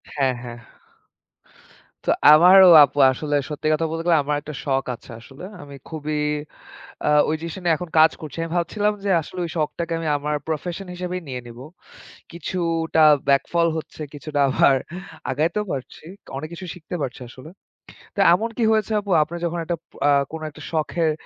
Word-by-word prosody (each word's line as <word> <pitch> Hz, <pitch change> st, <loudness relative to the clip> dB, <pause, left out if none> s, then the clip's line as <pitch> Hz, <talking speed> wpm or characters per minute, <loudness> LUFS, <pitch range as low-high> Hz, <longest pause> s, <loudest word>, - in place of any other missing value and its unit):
হ্যাঁ, 135 Hz, -3 st, +1 dB
হ্যাঁ। 120 Hz, -1 st, -7 dB, 1.5 s
তো -, -, +2 dB, 0.2 s
আমারও 180 Hz, +4 st, +8 dB
আপু 145 Hz, 0 st, -1 dB
আসলে 145 Hz, +3 st, -3 dB
সত্যি 150 Hz, 0 st, -4 dB
কথা 165 Hz, +1 st, 0 dB
বলতে 165 Hz, 0 st, -3 dB
গেলে, 170 Hz, -2 st, +5 dB
আমার 145 Hz, +1 st, -1 dB
একটা 150 Hz, +1 st, -8 dB
শখ 135 Hz, -2 st, 0 dB
আছে 120 Hz, -, -16 dB
আসলে। 135 Hz, +7 st, -14 dB, 0.2 s
আমি 140 Hz, -1 st, -11 dB
খুবই 155 Hz, -1 st, -4 dB, 0.9 s
আ -, -, +3 dB, 0.2 s
ওই 155 Hz, -, +1 dB
জিনিসটা 170 Hz, +3 st, -6 dB
নিয়ে 170 Hz, -2 st, +3 dB
এখন 180 Hz, +2 st, -7 dB
কাজ 160 Hz, +1 st, +7 dB
করছি। 155 Hz, -4 st, -9 dB
আমি 165 Hz, -, -4 dB
ভাবছিলাম 205 Hz, +5 st, 0 dB
যে 200 Hz, -, 0 dB
আসলে 165 Hz, +4 st, -10 dB
ওই 170 Hz, -, -5 dB
শখটাকে 165 Hz, +2 st, -2 dB
আমি 165 Hz, -1 st, -3 dB
আমার 150 Hz, +1 st, -2 dB
প্রফেশন 175 Hz, +4 st, -4 dB
হিসেবেই 180 Hz, 0 st, -4 dB
নিয়ে 125 Hz, -2 st, -5 dB
নিব। 120 Hz, 0 st, -11 dB, 0.7 s
কিছুটা 165 Hz, -2 st, -1 dB, 0.3 s
ব্যাকফল 170 Hz, +5 st, +2 dB
হচ্ছে, 160 Hz, 0 st, -8 dB
কিছুটা 145 Hz, 0 st, -5 dB
আবার 135 Hz, +1 st, +4 dB, 0.6 s
আগাইতেও 165 Hz, +10 st, -1 dB
পারছি। 130 Hz, -2 st, -7 dB, 0.2 s
তো -, -, -16 dB
অনেক 155 Hz, +3 st, -6 dB
কিছু 185 Hz, +2 st, -8 dB
শিখতে 180 Hz, 0 st, -8 dB
পারছি 130 Hz, -4 st, -4 dB
আসলে। 130 Hz, +5 st, -12 dB, 0.7 s
তা -, -, -6 dB
এমন 220 Hz, +6 st, 0 dB
কি 240 Hz, -, 0 dB
হয়েছে 220 Hz, -1 st, +1 dB
আপু? 205 Hz, -1 st, -9 dB
আপনি 160 Hz, +3 st, -9 dB
যখন 170 Hz, 0 st, -2 dB
একটা 175 Hz, -, -1 dB
পো -, -, -27 dB
আ -, -, +4 dB, 0.2 s
কোন 160 Hz, 0 st, -7 dB
একটা 150 Hz, -, -14 dB
শখের 160 Hz, 0 st, 0 dB
160 Hz, 175 wpm, -22 LUFS, 145-175 Hz, 1.5 s, আমারও